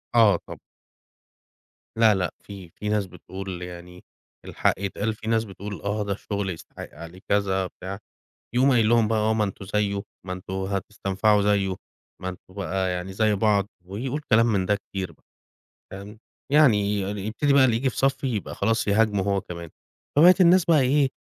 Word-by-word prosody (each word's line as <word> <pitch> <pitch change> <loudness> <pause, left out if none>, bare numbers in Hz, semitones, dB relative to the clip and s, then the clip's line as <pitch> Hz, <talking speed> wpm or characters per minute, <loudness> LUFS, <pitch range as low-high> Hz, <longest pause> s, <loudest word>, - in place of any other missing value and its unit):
آه 105 -6 +6
طب - - -9 1.4
لا، 110 -2 +5
لأ 95 -1 -1
في، 95 -4 -10
في 105 +5 -6
ناس 105 -2 +1
بتقول 95 +1 -8
يعني 90 0 -9 0.4
الحق - - +1
يتقال 100 +3 -2
في 110 0 -10
ناس 115 0 +2
بتقول: 100 0 -8
"آه 105 +1 -1
ده 100 -1 -2
الشُغل 100 -1 -4
يستحق 85 - -8
عليه 85 +2 -11
كذا،" 95 -2 +1
بتاع. 95 +3 -8 0.6
يقوم 130 +3 +4
قايل 115 -4 +3
لهم 115 -2 +4
بقى: 110 0 +1
"آه، 110 +1 +2
ما 110 -1 +1
أنتم 100 -1 -5
زيُّه، 100 0 -1 0.2
ما 90 - -4
أنتم 90 +1 -8
هتستنفعوا 100 +1 0
زيُّه، 100 -2 +1 0.5
ما 95 - -3
أنتم 90 0 -12
بقى 95 -1 -2
يعني 90 +1 -4
زي 105 +1 +2
بعض." 100 -1 +2 0.2
ويقول 125 +10 -4
كلام 115 +1 +6
من 100 -5 +1
ده 105 - +2
كتير 95 -2 -6
بقى، - - -25 0.7
فاهم؟ 100 +3 -9 0.3
يعني 145 -7 +6
ي 100 0 0 0.3
يبتدي 140 +6 +1
بقى 140 -1 +6
اللي 120 -3 +2
ييجي 130 +3 +1
في - - -10
صَفّي 135 0 +1
يبقى 100 - -5
خلاص 110 +1 0
يهاجمه 105 -1 +2
هو 100 -1 0
كمان. 85 -2 -8 0.5
فبقِت 180 +6 +7
الناس 180 0 +6
بقى 160 -5 +4
إيه، 135 +2 +3
100 Hz, 180 wpm, -25 LUFS, 95-110 Hz, 1.4 s, فبقِت